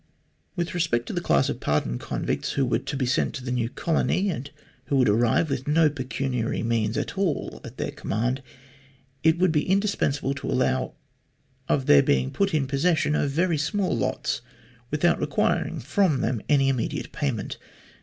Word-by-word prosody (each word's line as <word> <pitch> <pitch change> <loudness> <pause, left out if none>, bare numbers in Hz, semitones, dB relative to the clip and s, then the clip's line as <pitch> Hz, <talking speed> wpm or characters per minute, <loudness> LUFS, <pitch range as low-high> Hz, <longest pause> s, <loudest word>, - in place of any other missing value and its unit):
With 175 -2 -2
respect 160 -9 0
to - - -5
the - - -1
class - - +3
of - - -3
pardoned - - 0
convicts - - -2
who 135 - +1
were 125 - +1
to 140 - -5
be 130 - 0
sent 130 +3 0
to 130 - -6
the 125 - -2
new 120 -2 0
colony, 185 +6 0
and 140 -3 -5 0.4
who 140 - -1
would 130 -2 +4
arrive 115 +8 +3
with 135 -2 -3
no 155 0 +4
pecuniary 130 -3 -2
means 115 -1 0
at 195 - -3
all 180 -7 -1
at - - -10
their - - -2
command, 125 +6 -2 0.8
it 160 +1 +4
would 180 -1 +3
be 150 -2 +2
indis 200 +2 +1
pensable 140 -1 0
to - - -5
allow 130 0 0 0.7
of 135 -2 +2
their 70 - +7
being 65 -2 +1
put 200 0 +1
in 150 -4 +1
possession 150 +3 +1
of 145 - +1
very 165 +2 +1
small 185 - 0
lots 115 - -1 0.5
without 155 +4 +2
requiring - - 0
from 180 - +1
them 115 -2 -1
any 140 -2 +4
immediate 130 -4 -1
payment. 130 -8 -3
140 Hz, 180 wpm, -25 LUFS, 125-160 Hz, 0.8 s, their